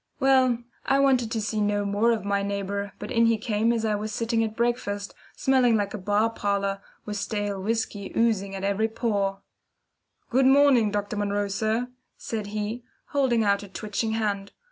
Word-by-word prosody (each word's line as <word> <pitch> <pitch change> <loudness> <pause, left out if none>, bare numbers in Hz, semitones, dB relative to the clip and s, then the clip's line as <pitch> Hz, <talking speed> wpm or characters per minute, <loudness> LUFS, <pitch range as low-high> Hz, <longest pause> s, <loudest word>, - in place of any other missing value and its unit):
Well, 260 -3 +4 0.3
I 270 - +2
wanted 265 -4 +3
to 225 - -2
see 215 0 -1
no 205 0 +1
more 205 +3 +2
of 220 -3 -1
my 200 0 +1
neighbour, 200 0 -3
but - - -7
in 230 -2 +4
he 230 -1 +3
came 220 +1 +1
as 230 -1 0
I 215 - +1
was 210 +1 -3
sitting 230 +1 0
at 220 -1 -3
breakfast, 220 -4 -1 0.2
smelling 255 -3 +3
like 200 -1 -2
a 210 - -4
bar 210 +4 +1
parlour, 200 -2 -1 0.2
with 210 -1 -4
stale 205 -2 -2
whisky 210 -1 -2
oozing 200 -4 +1
at 195 - -5
every 200 +2 +1
pore. 200 -4 -1 0.9
"Good 260 +2 +4
morning, 270 -5 +5
Dr. 205 0 -2
Munro, 205 0 0
sir," 220 +4 -1 0.3
said 215 -3 -4
he, 215 +3 -4 0.3
holding 260 -6 +2
out 200 -1 +2
a 205 - -9
twitching 215 +3 -3
hand. 205 -3 -2
215 Hz, 180 wpm, -26 LUFS, 200-230 Hz, 0.9 s, morning